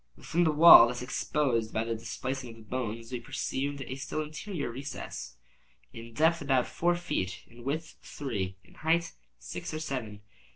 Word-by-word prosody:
Within 175 +1 +1
the 160 - +4
wall 150 -6 +10
thus 125 +1 -4
exposed 125 -3 0
by 110 - +1
the 115 0 -2
displacing 130 +3 -4
of 115 - -10
the 115 - -14
bones, 115 0 -4
we 125 - -3
perceived 140 +4 -3
a 130 - -6
still 155 +3 -3
interior 155 - -5
recess, 125 - -7 0.6
in 115 0 -10
depth 160 +4 +3
about 135 -3 +2
four 175 +1 +1
feet, 95 - -3
in 120 +1 -15
width 155 +5 -3
three, 100 -10 -4
in - - -21
height 165 +2 0 0.2
six 65 - -6
or - - -3
seven. 115 -9 -5
130 Hz, 170 wpm, -30 LUFS, 115-155 Hz, 0.6 s, wall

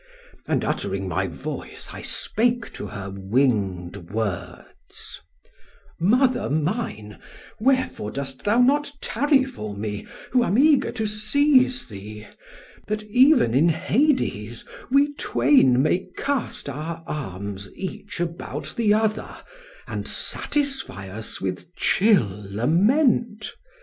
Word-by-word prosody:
And - - 0
uttering - - -2
my - - -1
voice - - -6
I - - -7
spake 240 +1 0
to - - -6
her 100 -1 -6
winged 95 -5 0
words: 105 -3 -6 0.8
"'Mother 250 +8 +3
mine, 150 - -2 0.4
wherefore 260 - +1
dost 135 +2 -5
thou 210 +4 +3
not 285 +3 +3
tarry 285 -2 +2
for 105 - -7
me 105 0 -4 0.2
who 250 -1 +4
am 205 -1 +1
eager 290 +1 +4
to 220 -2 -2
seize 255 +4 +2
thee, 105 0 -9 0.6
that 215 0 -2
even 250 - +4
in 150 +7 +4
Hades 160 - 0 0.2
we 280 +2 +3
twain 130 - +4
may 175 +5 +1
cast 280 - -2
our 160 +4 -5
arms 100 - -5
each 195 0 -6
about 170 -1 -4
the 215 -3 +3
other, 220 0 -1 0.5
and - - -5
satisfy 275 - -2
us 110 +4 -5
with 95 - -5
chill 115 - +2
lament? 210 - +2
180 Hz, 115 wpm, -24 LUFS, -, 0.8 s, who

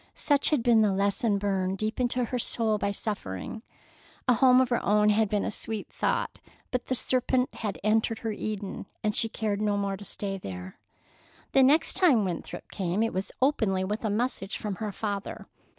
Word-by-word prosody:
Such 285 -1 +2
had 295 -7 +1
been 230 -2 +5
the 210 -2 +3
lesson 200 +2 +1
burned 195 -1 -1
deep 215 +4 -3
into 250 0 +1
her 250 +2 -3
soul 220 -2 0
by 200 - 0
suffering. 200 - -4 0.7
A 250 - +6
home 255 +2 +6
of 260 -1 +3
her 240 - 0
own 210 +1 +4
had 215 0 +3
been 205 0 0
a - - -2
sweet 220 0 -4
thought, - - -1 0.3
but 250 -1 -2
the 260 - 0
serpent 255 +1 +2
had 210 -4 -4
entered 220 +2 +2
her 225 - 0
Eden, 205 -2 -5 0.2
and 210 -1 +1
she 225 - +2
cared 210 -2 -2
no 205 -1 +1
more 200 -1 -1
to 205 - -10
stay 195 0 -3
there. 95 - -8 0.7
The 270 - +5
next 285 +5 +4
time 285 - +4
Winthrop 175 -3 -6
came 190 +2 -1
it 225 - -1
was 190 +1 -3
openly, 215 -9 +2
with 210 +4 -3
a 220 - 0
message 210 -2 -2
from 205 -3 -4
her 215 -2 -3
father. 200 -1 -4
215 Hz, 195 wpm, -28 LUFS, 200-235 Hz, 0.7 s, A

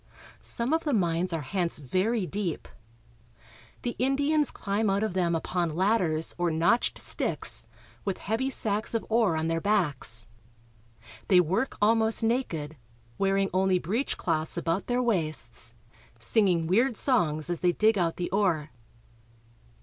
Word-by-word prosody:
Some 235 +5 -2
of 325 - +1
the 295 - 0
mines 175 -2 0
are 165 -2 -2
hence 175 +4 -2
very 185 - 0
deep. 190 -3 -4 1.2
The 240 - -2
Indians 285 +3 +2
climb 205 +2 -1
out 195 +2 +1
of 220 - -1
them 175 -2 +1
upon 170 -1 -2
ladders 180 -5 +1
or 175 -1 +2
notched 170 +9 +2
sticks, - - -1 0.4
with 195 -2 -2
heavy 225 +6 -1
sacks 215 -3 -1
of 225 - -1
ore 220 -6 +3
on 160 0 -1
their 165 0 -1
backs. 145 - 0 1.0
They 185 - +6
work 190 - 0
almost 225 +1 +3
naked, 165 - -1 0.4
wearing 195 0 +1
only 185 -1 +2
breechcloths 175 - -1
about 170 +2 -1
their 245 +1 +1
waists, 155 - -1 0.4
singing 170 - +2
weird 225 +7 +2
songs 155 - +1
as 175 - -2
they 175 0 +2
dig 215 +3 +3
out 170 -4 0
the 175 - -3
ore. 175 -7 +1
190 Hz, 140 wpm, -27 LUFS, 165-225 Hz, 1.2 s, They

